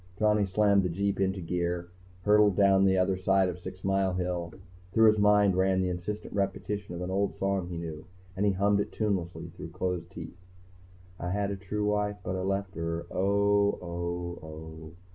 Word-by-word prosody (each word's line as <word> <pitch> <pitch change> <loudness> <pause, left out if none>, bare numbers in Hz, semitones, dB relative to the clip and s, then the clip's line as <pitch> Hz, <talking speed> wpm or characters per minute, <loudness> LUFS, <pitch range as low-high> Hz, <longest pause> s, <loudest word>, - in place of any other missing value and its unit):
Johnny 105 -1 +3
slammed 100 +1 +3
the 90 - -1
jeep 100 +3 -1
into 95 0 0
gear, 85 0 -2 0.3
hurtled 105 -1 +5
down 95 -1 +5
the 95 0 +3
other 95 +1 +2
side 95 +1 +2
of 90 0 -4
Six 95 +1 -9
Mile 95 -1 +1
Hill. 90 -2 -2 0.4
Through 110 +1 +5
his 110 0 +2
mind 105 -2 +4
ran 95 0 +2
the 95 -1 +1
insistent 105 +5 -5
repetition 100 -1 -2
of 85 - -6
an 90 - -4
old 100 +1 0
song 95 -2 0
he 85 -1 -5
knew, 80 -2 -6 0.3
and 95 - -1
he 100 -1 +3
hummed 100 +2 +2
it 100 - -2
tunelessly 95 -5 -2
through - - -9
closed 90 -1 -3
teeth. 85 -1 -9 0.8
_I 90 +1 -3
had 100 +1 0
a - - -2
true 100 +2 -3
wife 105 0 0
but 95 - -3
I 95 - -2
left 95 0 -2
her... 85 +1 -3
oh, 100 +2 +2
oh, 85 0 -4
oh. 80 0 -9
95 Hz, 190 wpm, -29 LUFS, 90-100 Hz, 0.8 s, hurtled